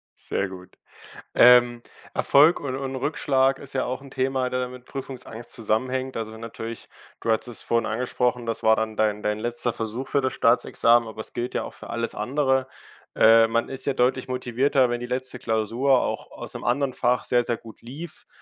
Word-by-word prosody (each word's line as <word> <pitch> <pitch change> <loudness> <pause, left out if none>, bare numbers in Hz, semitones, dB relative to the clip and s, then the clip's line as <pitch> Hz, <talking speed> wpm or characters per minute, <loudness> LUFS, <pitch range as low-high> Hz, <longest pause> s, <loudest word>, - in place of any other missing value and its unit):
Sehr 95 -1 -3
gut. 90 -1 -12 0.6
Ähm, 120 -1 +6 0.3
Erfolg 150 +5 +5
und 130 -2 -4
und 135 -1 -4
Rückschlag 135 -1 +1
ist 140 -1 -10
ja 130 - +1
auch 130 +1 -3
'n 140 - -12
Thema, 130 0 0
der 125 0 -1
mit 125 0 -12
Prüfungsangst 130 -4 -8
zusammenhängt. 130 +4 -2
Also 110 -1 -4
wenn 110 - -11
natürlich 115 0 -7 0.3
du 115 - -1
hattest 110 +2 0
es 120 - -7
vorhin 115 -1 0
angesprochen, 125 +1 -1
das 115 - -3
war 110 0 +5
dann 110 -1 -2
dein 105 -1 +1
dein 105 0 -1
letzter 120 +1 -1
Versuch 115 +4 -4
für 140 - +2
das 130 - 0
Staatsexamen, 115 0 +3
aber 110 0 -8
es - - -8
gilt 120 +1 -3
ja - - -1
auch - - -9
für - - -11
alles 115 0 -3
andere. 130 +3 +1 0.5
Äh, 115 0 +7
man 115 +1 0
ist 135 0 -5
ja 140 - +1
deutlich 130 0 +1
motivierter, 130 +1 +1
wenn 120 0 -2
die 120 - -4
letzte 125 0 -3
Klausur 115 +4 +1
auch - - -3
aus - - -9
'nem - - -7
anderen 130 +1 0
Fach 125 +1 +1
sehr 120 -1 +2
sehr 115 -1 -2
gut 115 - -14
lief, 150 +7 -9
125 Hz, 200 wpm, -24 LUFS, 115-130 Hz, 0.6 s, Äh